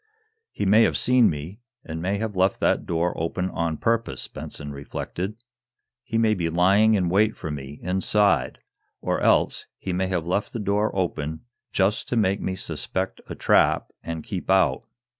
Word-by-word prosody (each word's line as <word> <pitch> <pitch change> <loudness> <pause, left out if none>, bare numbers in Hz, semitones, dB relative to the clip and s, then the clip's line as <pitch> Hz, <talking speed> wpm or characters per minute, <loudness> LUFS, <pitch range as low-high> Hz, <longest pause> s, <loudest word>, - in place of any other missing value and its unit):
"He - - -3
may 105 +4 +6
have - - +3
seen 125 -2 +4
me, 80 +8 -6 0.3
and 80 0 -5
may 95 +3 0
have 110 -1 -3
left 95 +1 +2
that - - +1
door 85 +1 0
open 90 +3 -2
on 85 -2 -1
purpose," 115 - -1
Benson 75 0 -7
reflected. 90 +7 -5 0.7
"He 115 -1 -3
may 110 -1 +3
be 85 -5 -1
lying 100 +6 +4
in 90 -3 +1
wait 105 +5 +2
for 80 - -5
me, 70 0 -7
inside. 95 -6 +2 0.4
Or - - -1
else - - +2
he 95 - -4
may 95 +1 0
have 90 -4 -1
left 95 +4 -1
that 115 - -3
door 105 +2 +1
open, 80 -4 -2 0.3
just 100 +2 +1
to - - 0
make 100 -2 +2
me 95 - -2
suspect - - -3
a - - -5
trap - - +3
and 80 -2 -5
keep 95 -2 -5
out. 90 -9 +3
95 Hz, 175 wpm, -24 LUFS, 80-105 Hz, 0.7 s, may